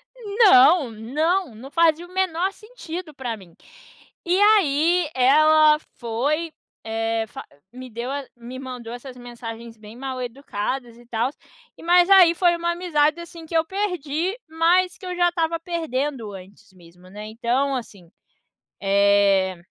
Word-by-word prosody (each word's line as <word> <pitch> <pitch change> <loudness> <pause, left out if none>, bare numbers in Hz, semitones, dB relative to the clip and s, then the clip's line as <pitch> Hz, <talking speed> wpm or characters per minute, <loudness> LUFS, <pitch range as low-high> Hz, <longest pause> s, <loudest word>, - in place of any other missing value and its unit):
Não, 380 - +5
não, 295 - -1
não 260 +6 -11
fazia 335 0 +2
o 355 - -17
menor 375 0 0
sentido 365 -8 -9
para 245 -5 -5
mim. 180 -5 -17 0.7
E 360 +3 +2
aí 350 -5 +3
ela 305 +4 +5 0.2
foi, 285 +8 -2 0.3
eh, 225 0 -2
fa - - -9 0.3
me 255 0 -9
deu 235 +3 -5
a 280 0 -4
me 240 +2 -9
mandou 250 -3 -8
essas 250 +1 -10
mensagens 235 -1 -9
bem 215 +1 -13
mal 260 0 -5
educadas 245 -1 -5
e 240 - -17
tals. 240 +4 -2 0.5
Mas 350 +2 +4
aí 365 -4 +7
foi 345 -1 +3
uma 340 0 -1
amizade, 335 -3 +1
assim, 335 -1 -11
que 330 - -7
eu 320 - +2
perdi, 360 -1 -2
mas 350 +3 +2
que - - -12
eu 360 0 -4
já 350 0 +3
estava 335 -1 -1
perdendo 290 -8 -3
antes 195 +2 -14
mesmo, 180 0 -18
né? 210 +2 -9
Então 245 +5 -1
assim, 200 -8 -9 0.7
eh, 200 -1 +3
280 Hz, 145 wpm, -22 LUFS, 230-340 Hz, 0.7 s, aí